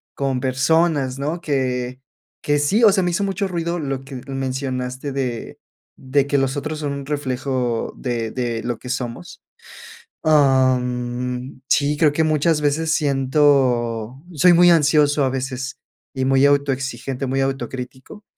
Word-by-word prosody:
con 135 -2 -1
personas, 135 +1 +1
¿no?, 155 +5 -3
que 130 -4 -2 0.4
que 145 0 +2
sí, 170 +11 +2
o 215 - +8
sea, 190 -1 +2
me 175 - 0
hizo 185 +4 0
mucho 195 0 -1
ruido 170 -1 -2
lo 135 -4 -3
que 135 0 -10
mencionaste 130 0 -3
de 125 -4 -4 0.4
de 135 +1 +1
que 140 0 +1
los 135 +1 -1
otros 155 +2 -4
son 145 -2 -2
un 140 -1 -6
reflejo 130 -4 -2
de 120 -3 -3
de 120 -3 -3
lo 120 -2 -3
que 125 - -9
somos. 120 -7 -5 0.8
Am, 125 -3 +1
sí, 145 +1 +2
creo 150 -1 +4
que 160 +2 +1
muchas 155 0 +2
veces 150 +2 0
siento, 135 -5 +1
soy 175 +4 +5
muy 175 +1 +6
ansioso, 150 -2 +3
a 135 - +2
veces, 130 0 -4 0.4
y 130 -1 -1
muy 135 +1 +4
autoexigente, 135 -2 0
muy 135 +1 0
autocrítico. 130 - -5
135 Hz, 145 wpm, -21 LUFS, 130-150 Hz, 0.8 s, o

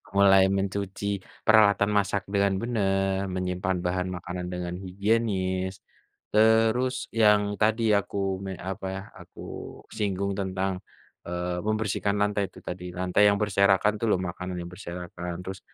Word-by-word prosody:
Mulai 95 -1 +6
mencuci 100 0 -2 0.4
peralatan 100 -2 +6
masak 100 0 0
dengan 100 0 +2
benar, 95 -4 0
menyimpan 90 0 -1
bahan 90 +1 -1
makanan 90 0 -5
dengan 90 -1 -4
higienis, 95 -1 -1 0.5
terus 110 +4 +4 0.2
yang 105 -2 +5 0.2
tadi 110 +2 +3 0.2
aku 100 - -6 0.3
me 95 - -4 0.2
apa 95 0 -5
ya, 95 - -5 0.2
aku - - -15 0.6
singgung 100 -1 -1
tentang, 95 0 -1 0.6
eee, 90 0 -3
membersihkan 105 -2 0
lantai 105 0 +1
itu - - -13
tadi, 90 0 -5
lantai 90 +2 0
yang 100 - 0
berserakan 100 0 +3
itu 105 - -8
loh 90 - +2
makanan 90 0 -4
yang 85 - -6
berserakan, 90 -1 -6
terus 95 0 -6
95 Hz, 135 wpm, -27 LUFS, 90-105 Hz, 0.6 s, Mulai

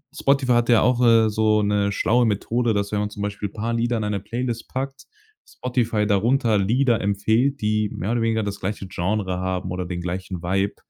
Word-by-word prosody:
Spotify 135 -2 +1
hat 120 0 +2
ja 115 -2 +5
auch, 125 -1 +2
äh, 115 -2 +5
so 110 0 +2
'ne 100 0 +1
schlaue 120 +4 +2
Methode, 115 +2 0
dass 100 0 -1
wenn 105 - 0
man 105 0 -1
zum 100 -1 -7
Beispiel 105 0 -3
paar 115 +3 -3
Lieder 120 0 0
in 110 - -2
eine 105 -1 -1
Playlist 115 +3 -4
packt, 135 +1 -5 0.4
Spotify 115 -4 -1
darunter 110 +2 +2
Lieder 115 +4 +2
empfiehlt, 110 +8 +1
die 105 0 +1
mehr 100 +6 -3
oder 120 - 0
weniger 110 -1 +1
das 100 -1 -5
gleiche 100 0 -4
Genre 95 0 -2
haben 95 0 -3
oder 90 0 -3
den 90 0 -4
gleichen 90 0 -5
Vibe. 95 +3 -1
105 Hz, 200 wpm, -23 LUFS, 100-120 Hz, 0.4 s, ja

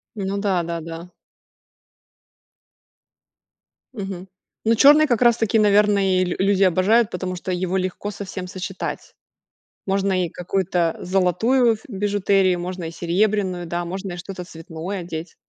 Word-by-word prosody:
Ну 200 -1 -3
да, 195 -4 +1
да, 170 0 -4
да. 165 +2 -8 2.8
Мгм. 195 -4 -6 0.4
Ну, 225 +1 +4
черный 295 +6 +7
как 240 -3 +1
раз-таки, 230 -2 +3
наверное, 205 -2 +3
и 180 - -1
л - - -3
люди 195 0 +2
обожают, 200 +5 +3
потому 185 0 -4
что 180 - -6
его 185 +1 -1
легко 185 +2 -3
со 200 0 -7
всем 185 -1 -6
сочетать. 185 +1 -6 0.7
Можно 195 -1 +1
и - - -6
какую-то 180 -1 -1
золотую 195 +7 +2
ф 220 - -5
бижутерию, 200 -3 +1
можно 180 0 -5
и 165 - -4
серебряную, 185 +1 0
да, 175 +1 -3
можно 190 +2 -5
и - - -6
что-то 180 +1 -7
цветное 165 +3 -7
одеть. 170 -1 -7
190 Hz, 140 wpm, -22 LUFS, 180-205 Hz, 2.8 s, черный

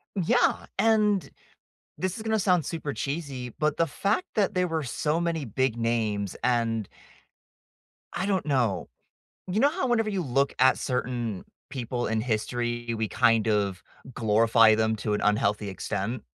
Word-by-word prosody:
Yeah, 180 -4 +2
and 210 -3 +2 0.7
this 185 0 -2
is 215 - -6
gonna 220 -1 0
sound 180 -5 +2
super 150 -3 -4
cheesy, 140 -5 -4
but 150 -1 +1
the 165 - +2
fact 200 - -1
that 205 -1 +2
there 180 -1 +1
were 160 -2 -2
so 150 +6 -1
many 165 -4 -1
big 130 +1 0
names 110 -4 -1
and 115 -4 +1 1.2
I 185 +3 -2
don't 190 -5 0
know. 120 -10 0 0.6
You 205 +5 0
know 285 - +5
how 335 -5 -2
whenever 225 -2 +2
you 195 -3 -1
look 140 0 0
at 130 +1 +5
certain 120 -5 -2 0.2
people 125 -2 -3
in 110 -1 0
history, 120 +1 -2
we 110 -1 -2
kind 115 -1 +3
of 100 -3 0 0.3
glorify 115 0 +5
them 110 0 +1
to 105 0 -2
an - - -1
unhealthy 105 0 +1
extent? 100 +4 -3
125 Hz, 155 wpm, -27 LUFS, 110-170 Hz, 1.2 s, know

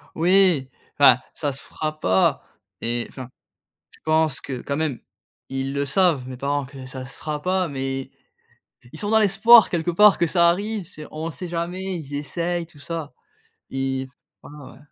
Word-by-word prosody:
Oui! 175 -6 +4 0.3
Enfin, 130 -3 +8 0.2
ça 145 -2 -2
se 135 - -8
fera 155 0 -5
pas 95 +1 +2 0.4
et 120 0 -2
enfin, 130 -2 -9 0.6
je - - -22
pense 155 -3 +2
que, 130 -3 -6
quand 140 - -3
même, 155 -6 -1 0.5
ils 135 +1 -3
le 140 0 -1
savent 150 -4 +2
mes 130 -1 -7
parents, 140 +1 -1
que 130 -1 -11
ça 130 0 -7
se 135 - -12
fera 150 -1 -4
pas, 185 0 0
mais 135 -1 -4 0.8
ils - - -8
sont 205 0 -2
dans 220 0 +5
l'espoir, 220 +3 +7
quelque 175 0 0
part, 210 +4 +6
que 170 - +3
ça 170 +1 +4
arrive. 200 +1 -1
C'est 155 -4 -10
on 160 +2 -4
sait 180 +3 -7
jamais, 180 +2 -3
ils 145 -2 -9
essayent 170 +4 -2
tout 160 -3 -18
ça. 160 -3 -5 0.6
Et 135 0 -2 0.3
enfin, 145 -2 -12
ouais, - - -16
155 Hz, 175 wpm, -23 LUFS, 135-175 Hz, 0.8 s, Enfin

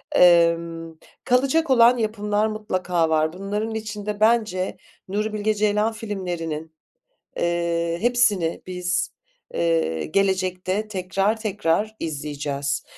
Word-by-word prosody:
Emm, 170 - +4 0.3
kalacak 275 +6 +2
olan 245 -1 +6
yapımlar 210 -1 0
mutlaka 185 -6 -1
var. 155 0 +1
Bunların 205 +4 -3
içinde 210 -1 -4
bence 215 -4 +2 0.3
Nuri 210 +3 -2
Bilge 215 0 0
Ceylan 210 +1 +1
filmlerinin, 175 -8 -4 0.7
eee, 170 -1 0
hepsini 215 -8 +2
biz, 180 -1 -1 0.4
eee, 165 - 0
gelecekte 190 +2 0
tekrar 195 +2 -1
tekrar 210 0 0
izleyeceğiz. 145 -2 -3
190 Hz, 95 wpm, -23 LUFS, 170-215 Hz, 0.7 s, olan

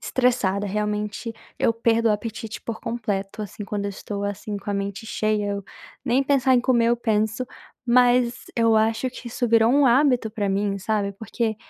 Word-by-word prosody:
estressada, 225 -6 +1
realmente 210 +2 -2 0.3
eu 230 - +3
perco 230 0 +2
o 215 - +5
apetite 220 +1 -5
por 230 -1 -5
completo, 210 -3 -3
assim, 205 +1 -7
quando 205 -1 -3
eu 200 - -2
estou, 200 +1 -6
assim, 205 +1 -4
com 200 +1 -6
a - - -1
mente 200 +2 -3
cheia 215 -1 0
eu, 200 -1 -4 0.4
nem 255 +3 +2
pensar 265 -2 +3
em 245 - +4
comer 240 -2 +3
eu 240 - +3
penso, 220 +1 0 0.4
mas 245 0 +3
eu 230 -1 +4
acho 225 +3 +1
que 255 - -10
isso 245 +1 -2
virou 230 0 +5
um 285 +1 +4
hábito 250 -3 +3
pra 205 -2 -2
mim, 200 0 0
sabe, 200 0 -1
porque 220 +2 -3
220 Hz, 185 wpm, -24 LUFS, 205-240 Hz, 0.4 s, o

